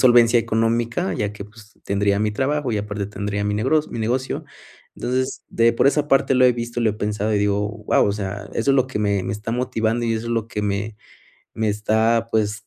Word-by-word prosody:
solvencia 120 -2 +6
económica, 115 -3 0
ya 100 +4 -2
que, 105 -1 -9
pues, 110 0 -18
tendría 100 0 +1
mi 105 0 +1
trabajo 135 +3 -1
y - - 0
aparte 105 -1 -3
tendría 100 0 -3
mi 105 0 0
negro 130 +9 +2
mi - - -5
negocio. 125 +4 -1 0.5
Entonces, 130 +1 -2 0.3
por - - +3
esa 145 +1 +2
parte 135 -1 +3
lo 130 0 +5
he 125 - +6
visto, 120 0 -5
lo 110 - +3
he - - -4
pensado 105 0 -1
y - - +2
digo: 100 0 +1
"Guau", 105 -1 +1
o 100 - +1
sea, 100 0 -5
eso 115 +4 +1
es - - +3
lo 130 -1 +3
que 130 - -4
me 100 -2 +1
me 95 +1 -3
está 105 +2 -5
motivando 115 -1 -1
y 115 - +1
eso 110 +1 -3
es 120 - -2
lo 115 -2 -1
que 105 - -4
me 105 +1 -2 0.6
me 110 -1 0
está, 110 +2 +1
pues, 110 0 -1
110 Hz, 225 wpm, -22 LUFS, 105-120 Hz, 0.6 s, solvencia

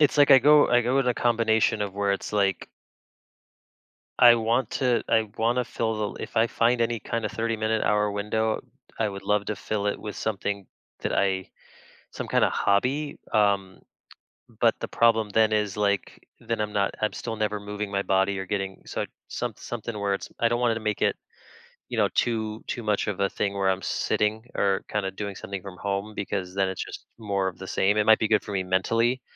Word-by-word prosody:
it's, 150 0 +3
like, 145 0 +6
I 135 - +10
go 145 +3 +6
I 120 0 +4
go 125 +3 +1
with 135 -2 +2
a 125 - +2
combination 110 -2 +2
of 100 -2 -3
where 100 0 +1
it's 100 - -4
like 100 -3 +1 1.5
I 120 -1 +9
want 115 +1 0
to 125 -3 +1
I 110 -2 +3
wanna 120 +3 +1
fill 110 -3 -2
the - - -8
if - - -8
I 115 - +5
find 115 +1 +1
any 115 -1 0
kind 115 +1 -3
of - - -6
30 115 0 -1
minute, 110 0 0
hour 105 0 +2
window, 110 +2 -1 0.4
I 110 - +1
would 100 0 -8
love 105 0 +1
to 105 - -2
fill 105 -1 -3
it - - -2
with 105 - -6
something 100 -2 -3 0.3
that - - -2
I 95 -2 0 0.6
some - - -6
kind - - +2
of - - +3
hobby, 135 +9 +1 0.2
um, 100 -3 +2 0.8
but - - +4
the - - -2
problem 115 -2 +3
then 110 +1 +3
is, 105 -1 0
like, 100 -2 -1 0.2
then 115 -1 -3
I'm 105 0 -3
not 100 -1 +1
I'm 110 - 0
still 115 -2 -5
never 105 -1 -1
moving 105 0 -5
my 100 - 0
body 95 0 +1
or 95 - -4
getting 95 -1 -3
so - - -3 0.2
some - - -3
something 115 -2 -6
where 100 -1 0
it's - - -7
I 115 - +4
don't 120 0 0
wanna 115 -2 +2
make 105 -1 -2
it, - - +2 0.7
you - - -4
know, - - +3
too 110 -2 -1
too 120 - -3
much 105 -2 +1
of 105 -2 -3
a 100 0 +2
thing 100 -1 -2
where 100 -1 +1
I'm 95 0 -1
sitting 110 +1 0
or 95 -1 +1
kinda 100 -2 -1
doing 100 0 -5
something 100 -1 -6
from 95 -1 -10
home 100 +1 -3
because 95 -1 -4
then 95 -1 +2
it's 95 - -3
just - - -10
more 100 -3 -1
of 90 -1 -6
the 95 - -7
same. 100 +2 +2
It 105 - +3
might 110 - +7
be 110 - +1
good 110 -1 +3
for - - -7
me 95 - 0
mentally, 115 +7 +1
105 Hz, 215 wpm, -26 LUFS, 100-115 Hz, 1.5 s, I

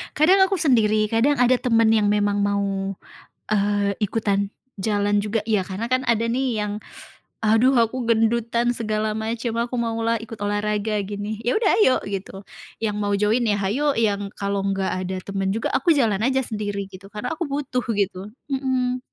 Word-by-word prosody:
Kadang 375 +6 +5
aku 390 - -1
sendiri, 215 - +2
kadang 235 +6 +3
ada 250 +1 +4
teman 230 -3 +3
yang 215 -2 +3
memang 205 0 +1
mau, 200 -1 -1 0.5
eee, 205 -1 +1
ikutan 200 -1 0 0.2
jalan 205 0 0
juga. 215 +1 0
Iya 210 -4 +2
karena 195 +4 -4
kan 255 +1 +1
ada 230 -2 +1
nih 245 -1 0
yang 210 0 -3 0.6
"Aduh 225 +5 +4
aku 235 +2 0
gendutan" 235 +1 +2
segala 215 -1 -1
macam. 225 +1 -3
"Aku 245 +1 -5
mau 230 -1 -1
lah 230 0 +1
ikut 225 0 -9
olahraga" 210 +1 -1
gini. 205 +2 -5
"Iya 240 - +2
sudah 430 -3 +3
ayo" 260 - +5
gitu. 195 -1 -5 0.5
Yang 210 -2 0
mau 205 -1 0
join 210 +4 +2
ya 210 -2 +2
hayo, 275 +10 +1
yang 205 -3 0
kalau 200 0 -2
enggak 195 -1 0 0.2
ada 185 +1 -3
teman 195 -1 -2
juga 225 - -1
aku 305 +6 +3
jalan 225 -8 +2
saja 265 +2 +2
sendiri, 205 -3 -4
gitu. 195 +1 -12
Karena 210 +7 -4
aku 345 - -2
butuh 275 -3 -2
gitu, 200 0 -2 0.2
mhm. 260 -2 0
215 Hz, 175 wpm, -23 LUFS, 205-235 Hz, 0.6 s, Kadang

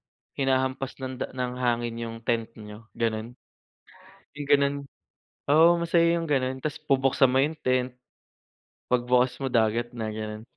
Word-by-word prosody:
ng,hinahampas 130 0 -2
ng 130 0 -5
da - - -2
ng 125 0 -3
hangin 120 -1 0
yung 115 -1 -5
tent 115 -2 0
niyo, 105 +1 -11
ganun, 115 +1 -2 1.0
yung 145 -1 -6
ganon, 140 0 +4 0.7
oo, 165 +4 +6
masaya 170 0 +3
yung 165 - -4
ganun, 130 -2 0
'tas 150 +1 -5
bubuksan 135 -2 +3
mo 130 - +3
yung 150 +4 +1
tent. 130 0 0 1.0
Pag 125 -1 +1
bukas 125 0 +2
mo 135 - -3
dagat 120 0 +1
na, 110 -2 -3
ganun, 110 0 -6
130 Hz, 150 wpm, -26 LUFS, 115-140 Hz, 1.0 s, oo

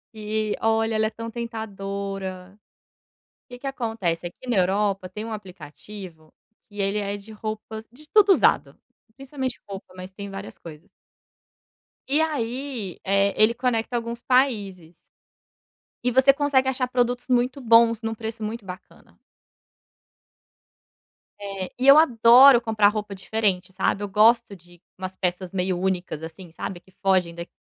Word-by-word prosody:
que, 215 0 -2
olha, 225 0 +1
ela 215 0 +2
é - - -2
tão 230 +1 -7
tentadora. 200 -4 -6 0.9
Que 245 -1 -10
que 275 - -9
acontece: 225 -10 -2
aqui, 175 +8 -10
na 225 - +2
Europa, 195 0 +1
tem 210 +4 -7
um 225 - -6
aplicativo 185 -3 -10 0.4
que 205 -1 -14
ele 200 +1 0
é 200 0 -2
de 205 +2 -12
roupas 220 +1 -7
de 295 +6 -15
tudo 420 -2 +5
usado, - - +2 0.4
principalmente 265 -2 -5
roupa, 195 -2 -9
mas 185 +1 -9
tem 200 +1 -8
várias 195 +1 -9
coisas. 165 +2 -12 1.2
E 290 +4 +2
aí, 255 - -3
eh, 195 +1 +2
ele 215 +2 +4
conecta 245 -1 -1
alguns 235 0 -4
países. 205 -11 0 1.1
E 250 - +1
você 265 +2 +6
consegue 280 -2 +2
achar 255 -1 -1
produtos 245 0 -1
muito 250 +1 +1
bons, 230 -1 +5
num 225 -1 -3
preço 220 0 -6
muito 220 0 -5
bacana. 185 0 -12 2.2
É, 195 -2 -5
e 255 - -2
eu 275 +2 +10
adoro 245 -2 +7
comprar 220 -3 +3
roupa 210 -1 -2
diferente, 190 -2 -1
sabe? 195 +2 0
Eu - - -2
gosto 215 +1 +3
de 175 0 -20 0.2
umas 185 0 -6
peças 180 0 -3
meio 185 -1 -1
únicas, 180 -4 -2
assim, 170 +2 -9
sabe, 175 +2 -6
que 190 - -25
fogem 185 -3 +2
daq 170 +1 -7
215 Hz, 145 wpm, -24 LUFS, 190-235 Hz, 2.2 s, eu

